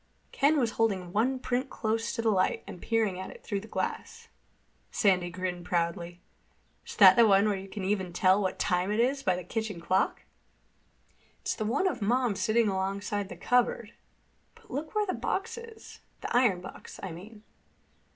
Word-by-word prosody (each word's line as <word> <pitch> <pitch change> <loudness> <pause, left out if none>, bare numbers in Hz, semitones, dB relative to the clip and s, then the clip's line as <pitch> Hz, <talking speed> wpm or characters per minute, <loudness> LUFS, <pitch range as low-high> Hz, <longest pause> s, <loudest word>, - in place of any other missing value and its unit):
Ken 290 +3 +3
was 235 -4 +1
holding 190 -5 0
one 250 +5 +2
print 255 +1 -2
close 225 +1 -1
to 230 - -2
the 225 - +3
light 185 -2 +1
and 175 - -9
peering 220 -5 0
at 190 - -6
it - - -13
through 200 - -2
the 215 - -11
glass. 460 - -4 0.6
Sandy 185 -4 +2
grinned 180 0 -4
proudly. 170 0 -2 0.7
"Is - - -7
that - - +9
the 235 -2 +6
one 200 0 +5
where 210 -1 +2
you 190 0 -7
can 200 0 -6
even 190 -2 -1
tell 185 +3 +3
what 190 - -1
time 180 +1 0
it 210 - 0
is 265 +4 +2
by 185 -9 +1
the 180 - -5
kitchen 220 -4 -4
clock?" 185 +3 0 1.2
"It's - - -1
the 215 - -3
one 275 - +1
of 250 -10 -2
Mom 240 +1 +1
sitting 225 +2 +2
alongside 195 +1 -2
the - - -8
cupboard. 235 -2 +1 0.6
But 460 -2 -19
look 305 +5 -5
where 420 0 +2
the 370 - -2
box - - -2
is—the 465 - -9
iron 230 -8 +3
box, 185 - -10
I 185 - -4
mean." 210 +6 -11
210 Hz, 180 wpm, -29 LUFS, 185-245 Hz, 1.2 s, that